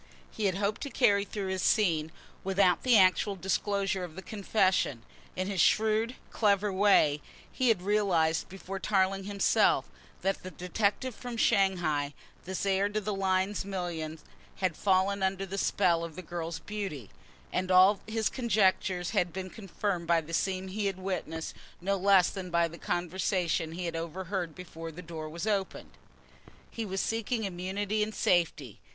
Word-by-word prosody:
He 215 - -3
had 190 -2 +2
hoped 205 +2 -1
to 285 - -4
carry 205 -6 +3
through 200 -2 -4
this 190 -1 -2
scene 165 -9 +2 0.3
without 190 -2 +3
the 250 -3 +5
actual 195 +1 +4
disclosure 195 0 -1
of 170 -3 -7
the 190 - -8
confession. 190 - +1 0.3
In 185 - -1
his 195 -3 +1
shrewd, 220 +3 +3 0.2
clever 205 -2 +2
way 185 -7 +4 0.3
he 255 - 0
had 220 -6 +3
realised 185 -6 +1
before 195 +1 -7
Tarling 195 -1 +1
himself, 200 -1 +2 0.3
that 195 0 0
the 185 - -7
detective 205 +7 -1
from 245 +1 -7
Shanghai, 165 -10 +2 0.3
this 190 +2 -3
heir 195 +1 +2
to 210 +1 -1
the 210 0 -3
Lyne 190 0 +1
millions, 170 -5 -4 0.3
had 185 -4 -1
fallen 195 +2 +2
under 190 0 0
the 195 +1 -4
spell 170 -3 +2
of 165 -2 -7
the 185 - -7
girl's 170 0 -4
beauty, 190 - -6 0.4
and 185 0 -1
all 185 +2 +6
his 220 -1 0
conjectures 195 -6 +1
had 180 -5 +1
been 185 +1 -6
confirmed 195 -4 -3
by 170 0 +4
the 165 +1 -9
scene 190 +2 -1
he 205 +1 -1
had 195 -2 -2
witnessed, 180 -4 -4 0.3
no 195 +3 0
less 195 -1 +4
than 185 -2 -6
by 170 -1 +2
the 170 +1 -11
conversation 175 -2 -1
he 180 +1 -4
had 170 - -3
overheard 170 +1 -4
before 165 -2 -8
the 180 +3 -10
door 160 -2 -6
was 170 +5 -5
opened. 200 -3 -2 0.8
He 230 - -4
was 190 0 -1
seeking 225 +1 -1
immunity 195 +3 -2
and 215 +1 -2
safety. 155 - +1
190 Hz, 165 wpm, -30 LUFS, 175-200 Hz, 0.8 s, all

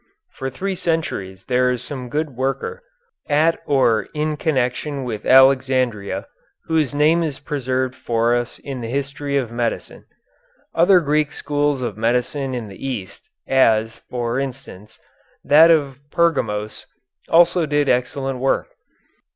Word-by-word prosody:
For 135 - -5
three 190 +9 -3
centuries 160 - -3
there 125 0 +2
is 125 -1 -2
some 125 -2 -6
good 155 +2 -2
worker, 135 - -3 0.5
at 155 +3 +3
or 115 -7 +2
in 155 0 -1
connection 140 -1 -1
with 110 -4 -5
Alexandria, 130 -5 +3 0.4
whose 155 -4 0
name 155 +3 +3
is 155 -5 -2
preserved 130 -3 -2
for 120 -2 0
us 120 -1 -3
in 135 -3 -7
the 115 - -4
history 140 +2 -2
of 125 -4 -2
medicine. 120 -1 -3 0.7
Other 175 +2 +5
Greek 150 0 +1
schools 145 -2 -1
of 110 -4 -4
medicine 125 +4 -1
in 120 -3 -5
the 100 +3 -12
East, 120 -9 -6 0.2
as, 110 -4 +3
for 120 0 -2
instance, 130 -7 -7 0.5
that 160 +3 +7
of 140 -5 +2
Pergamos, 110 - -1 0.4
also 170 0 +4
did 145 -1 +1
excellent 130 +1 -1
work. 135 +1 0
135 Hz, 135 wpm, -20 LUFS, 120-150 Hz, 0.7 s, that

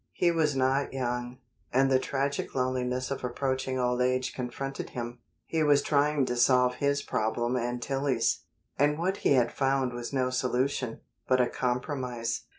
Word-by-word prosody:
He 175 - +2
was 155 -4 +1
not 135 +1 +1
young, 125 -1 -3 0.3
and 135 +1 +3
the 130 - +5
tragic 140 +2 -2
loneliness 130 0 -1
of 140 - -3
approaching 130 +1 -1
old 125 0 +1
age 130 0 +1
confronted 135 +2 -5
him. 120 0 -6 0.3
He 160 - -1
was 145 -2 +4
trying 145 -1 +2
to 125 - -2
solve 125 0 +4
his 140 0 +1
problem 120 +3 -1
and 120 0 -1
Tillie's, 135 -3 +1 0.4
and 145 +1 +3
what 185 +4 0
he - - +3
had 125 -3 +3
found 135 -2 +1
was 120 -1 -5
no 130 -2 0
solution, 125 -1 -1 0.3
but 130 0 +3
a 125 - +5
compromise. 125 -2 -2
130 Hz, 160 wpm, -29 LUFS, 125-140 Hz, 0.4 s, the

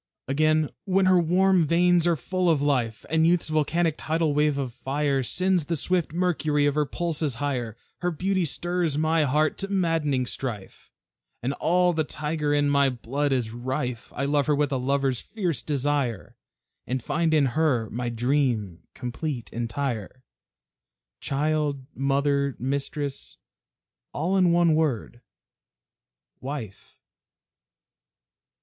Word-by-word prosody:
Again, 155 +2 +2
when 190 -1 +2
her 185 -1 +5
warm 180 0 +3
veins 175 +1 +3
are 170 - +3
full 180 +5 -1
of 160 -3 +3
life, 125 -6 0
And 160 0 +4
youth's 170 -2 +2
volcanic 155 +2 +1
tidal 160 -1 0
wave 150 -1 +2
of 130 -4 -3
fire 140 +1 -1
Sends 180 +6 +1
the 170 - -1
swift 175 +2 0
mercury 155 -4 +1
of 145 - +2
her 150 0 +1
pulses 155 -3 -2
higher, 120 -4 -3 0.2
Her 175 - 0
beauty 185 +3 0
stirs 170 -1 -1
my 155 0 +2
heart 150 +3 +1
to 195 - -2
maddening 165 -9 +1
strife, 115 -6 -6 0.5
And 130 +3 0
all 180 +4 +2
the 160 -1 +1
tiger 150 0 -2
in 145 0 +2
my 140 -1 +3
blood 135 +4 -2
is 125 -4 0
rife; 125 0 -4
I 135 - -1
love 145 0 +1
her 150 - +3
with 145 0 0
a 135 - +1
lover's 135 -1 0
fierce 175 - -3
desire, 140 - -1 0.5
And 130 -1 -2
find 165 +2 0
in 155 -3 +4
her 135 -8 +1
my 120 +1 -2
dream, 120 - 0
complete, 125 0 -5
entire, 120 0 -3 1.0
Child, 145 -1 -1
Mother, 140 0 +1
Mistress 140 +2 -4 0.8
all 175 +6 0
in 180 -3 +4
one 170 -1 +4
word 135 -6 -1 1.2
Wife. 130 -8 -7
145 Hz, 135 wpm, -25 LUFS, 130-165 Hz, 1.2 s, her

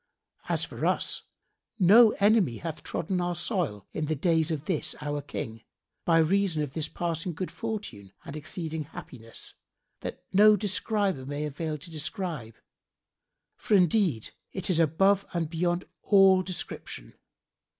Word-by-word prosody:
[FN#74] - - -15
As - - +1
for - - -4
us, - - 0 0.6
no 215 +4 +8
enemy 200 - +3
hath 160 -2 -5
trodden 180 +2 -2
our 175 0 -1
soil 170 - -2
in 155 - -1
the 155 +1 0
days 160 +1 +2
of 155 -2 -3
this 175 -6 -1
our 145 0 -2
King, 115 -6 -6 0.4
by 165 -1 +4
reason 165 -1 +2
of 140 -3 -5
this 160 -2 -2
passing 170 0 -3
good 185 +2 -4
fortune 205 - -5
and 140 - -7
exceeding 155 0 -4
happiness, 115 -6 -7 0.5
that - - -6
no 210 +2 +8
describer 205 - 0
may 145 +3 -3
avail 150 +1 -3
to 170 +4 -11
describe, 155 - -4 1.0
for 215 - +1
indeed 175 - +3 0.2
it 190 -1 -2
is 165 - +2
above 195 +5 +4
and 165 -2 -1
beyond 175 +1 0 0.2
all 195 -2 +6
description. 175 - -6
165 Hz, 145 wpm, -28 LUFS, 150-190 Hz, 1.0 s, no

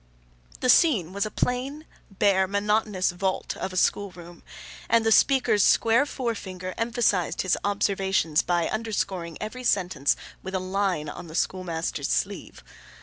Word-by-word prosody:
The 255 - +1
scene 215 - +3
was 200 +2 -1
a - - -6
plain, 265 +7 -2 0.2
bare, 195 -1 +2
monotonous 200 -1 0
vault 185 +1 -2
of 190 - -4
a 185 - -6
school 200 +2 +1
room, 175 -1 -13 0.5
and 230 0 +3
the 225 - +3
speaker's 235 -4 +4
square 230 +5 +4
forefinger 190 -9 -4
emphasized 230 -6 0
his 185 - +2
observations 195 -5 +1
by 175 -1 0
underscoring 195 -6 -3
every 235 +4 -6
sentence 180 - +1 0.3
with 190 0 -6
a - - +1
line 185 -4 -1
on 150 - -8
the 160 - -10
schoolmaster's 170 -3 -2
sleeve. - - -3
195 Hz, 145 wpm, -25 LUFS, 180-225 Hz, 0.5 s, speaker's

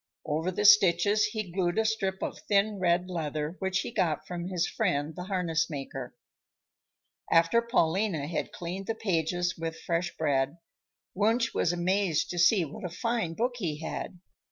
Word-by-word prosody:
Over 160 +3 -1
the 195 +3 -1
stitches 205 0 +6
he 215 -3 -4
glued 175 +1 0
a 220 - +2
strip 195 -4 -1
of - - -4
thin 205 0 +2
red 175 0 +2
leather 155 -2 -3
which 190 0 0
he - - -5
got 160 -8 0
from 175 -1 -5
his 180 -2 0
friend, 145 +2 -1
the 180 0 -6
harness 170 -5 0
maker. 135 -4 -6 1.2
After 165 +8 +4
Paulina 190 - +1
had 160 - -3
cleaned 185 +3 -6
the 225 - -1
pages 175 -3 -1
with 165 0 -4
fresh 170 +1 -2
bread, 140 0 0 0.6
Wunsch 225 +4 +1
was 170 - +1
amazed 175 -1 0
to 175 - -3
see 180 0 +5
what 205 +9 -9
a 180 - -3
fine 225 -2 -2
book 245 +4 -1
he 165 -9 -2
had. 165 +2 -5
180 Hz, 165 wpm, -29 LUFS, 165-205 Hz, 1.2 s, stitches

